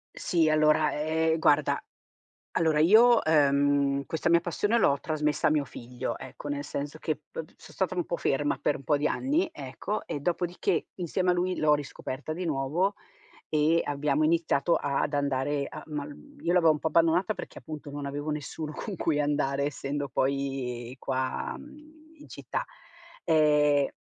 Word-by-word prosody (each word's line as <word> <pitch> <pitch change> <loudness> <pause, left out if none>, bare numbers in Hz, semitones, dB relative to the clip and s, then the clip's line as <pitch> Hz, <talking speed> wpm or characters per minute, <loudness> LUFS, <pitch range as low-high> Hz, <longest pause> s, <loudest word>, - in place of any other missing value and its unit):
Sì 165 -3 +1
allora, 155 0 +4
ehm, 160 +1 0
guarda, 150 -1 +2 0.7
allora 160 -2 +2
io, 225 +8 +6
ehm, 140 -2 +3
questa 160 +1 -1
mia 170 0 +5
passione 205 +6 0
l'ho 140 -11 +3
trasmessa 150 -2 0
a - - +4
mio 150 -1 +2
figlio, 125 -1 -6
ecco, 145 - -8
nel 145 0 -3
senso 145 +2 -5
che 155 - -1 0.2
p - - -7 0.2
so' - - -15
stata 185 -1 -1
un 175 - 0
po' 170 - -3
ferma 145 0 0
per 145 - +1
n - - -13
po' 145 +2 +2
di 150 +1 +1
anni, 320 +7 0
ecco, 135 +10 -5
e 145 - -4
dopodiché, 175 +3 -1
insieme 180 +1 -1
a - - +3
lui, 180 +1 0
l'ho 150 -1 +4
riscoperta 145 0 -5
di 180 +3 -4
nuovo 160 +6 0 0.5
e 155 +2 +3
abbiamo 145 +1 +1
iniziato 165 -1 +2
ad 145 +1 -1
andare 140 0 0
a - - -8
ma 150 -2 -4
l 145 - -9 0.3
io 175 +2 +2
l'avevo 165 -3 +5
un 150 - -1
po' 160 - -1
abbandonata 165 +6 +3
perché, - - -8
appunto, 155 -2 -8
non 145 0 -6
avevo 145 +2 -4
nessuno 150 +1 -4
con 200 +2 -6
cui 150 -2 +1
andare, 140 -1 0
essendo 145 0 -3
poi 130 -2 -2
qua, 130 -1 -2
mhmm, 305 +2 -16
in 295 - -14
città. - - -5 0.6
Ehm 150 -3 +3
150 Hz, 170 wpm, -28 LUFS, 140-170 Hz, 0.7 s, io